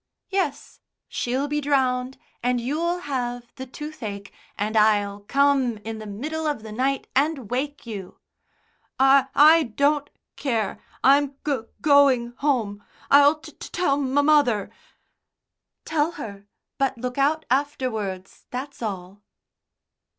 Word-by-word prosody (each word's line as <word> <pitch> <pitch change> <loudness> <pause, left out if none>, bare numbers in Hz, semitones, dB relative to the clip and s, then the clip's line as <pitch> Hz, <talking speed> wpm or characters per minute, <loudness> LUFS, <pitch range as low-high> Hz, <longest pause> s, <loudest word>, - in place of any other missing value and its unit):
"Yes, 370 -8 -2 0.3
she'll 260 +4 -2
be 295 +1 -1
drowned, 260 -2 0 0.2
and 245 0 +1
you'll 330 +8 -1
have 245 -4 -4
the 260 0 -8
toothache, 225 -9 -7 0.2
and 210 +2 -2
I'll 205 -2 +3
come 270 +1 +2
in 225 0 -5
the 215 - -8
middle 305 +10 -4
of 290 -8 -2
the 220 - -8
night 265 +4 -1
and 275 -5 0
wake 280 +3 -3
you." 200 -5 -7 0.8
"I 270 0 +5
I 315 +3 +7
don't 285 +3 +1 0.3
care. 230 -7 -2 0.2
I'm 280 +1 +4
go 265 -7 -2
going 275 -5 +4
home. 225 -8 -1 0.3
I'll 285 +2 +7
t - - -11
t 360 - -6
ell 280 -3 +3
m 280 +2 +1
other." 250 -10 +3 1.1
"Tell 315 +1 0
her. 200 -9 -8 0.3
But 270 -2 +1
look 250 +2 -4
out 310 +3 +2
afterwards, 240 -9 -2
that's 265 +2 -6
all." 195 -2 -5
265 Hz, 130 wpm, -24 LUFS, 225-290 Hz, 1.1 s, I